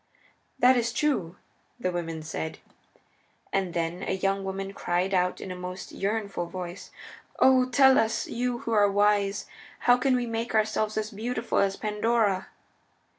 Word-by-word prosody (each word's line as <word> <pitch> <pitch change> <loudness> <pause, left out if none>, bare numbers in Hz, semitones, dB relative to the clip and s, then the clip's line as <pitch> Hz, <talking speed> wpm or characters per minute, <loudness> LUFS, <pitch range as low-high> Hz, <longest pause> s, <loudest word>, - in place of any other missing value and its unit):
"That 250 +1 +5
is 235 -1 0
true," 235 - 0 0.4
the 185 -6 -1
women 165 -2 -4
said. 160 0 -4 1.0
And 190 -3 -1
then 170 +2 -2
a - - -2
young 195 +1 0
woman 195 0 -4
cried 180 +1 -1
out 180 -1 +1
in 190 - -6
a - - -5
most 180 +1 -7
yearnful 200 -3 -2
voice, 180 +1 -7 0.5
"O 255 -1 +5
tell 265 +1 +6
us, 220 0 0
you 245 0 -2
who 230 - -4
are 205 -2 +4
wise, 205 0 +2 0.4
how 245 0 +5
can 255 +1 +2
we 245 -1 0
make 230 0 -3
ourselves 215 0 +1
as 215 +1 -2
beautiful 230 +2 -2
as 195 -1 +2
Pandora!" 210 -2 0
205 Hz, 155 wpm, -27 LUFS, 185-230 Hz, 1.0 s, tell